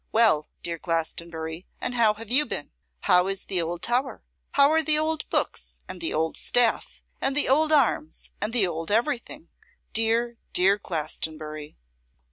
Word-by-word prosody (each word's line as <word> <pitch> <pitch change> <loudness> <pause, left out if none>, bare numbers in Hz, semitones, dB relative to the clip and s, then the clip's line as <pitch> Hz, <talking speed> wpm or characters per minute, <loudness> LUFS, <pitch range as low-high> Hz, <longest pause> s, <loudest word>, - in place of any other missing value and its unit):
Well, 215 -10 +4 0.2
dear 170 -1 -4
Glastonbury, 165 0 -3
and 250 - -3
how 225 -3 +3
have 225 +1 -10
you 290 +3 +4
been? 145 - -4 0.3
How 180 +1 +4
is 195 0 -3
the 185 -3 0
old 170 +1 -4
tower? 255 +3 -1 0.3
How 280 +1 +5
are 320 0 +4
the 310 -1 +3
old 315 0 -1
books, - - -2
and - - -7
the 335 - -1
old 160 +1 -1
staff, 245 -2 +1 0.2
and 270 +1 0
the 295 - +5
old 310 +4 +3
arms, 250 - +1
and 210 +2 -1
the 230 -4 +3
old 165 -2 -4
everything? 235 +4 -1 0.4
Dear, 230 +1 +1
dear 195 +3 +4
Glastonbury! 155 -3 -4
215 Hz, 160 wpm, -25 LUFS, 165-250 Hz, 0.4 s, How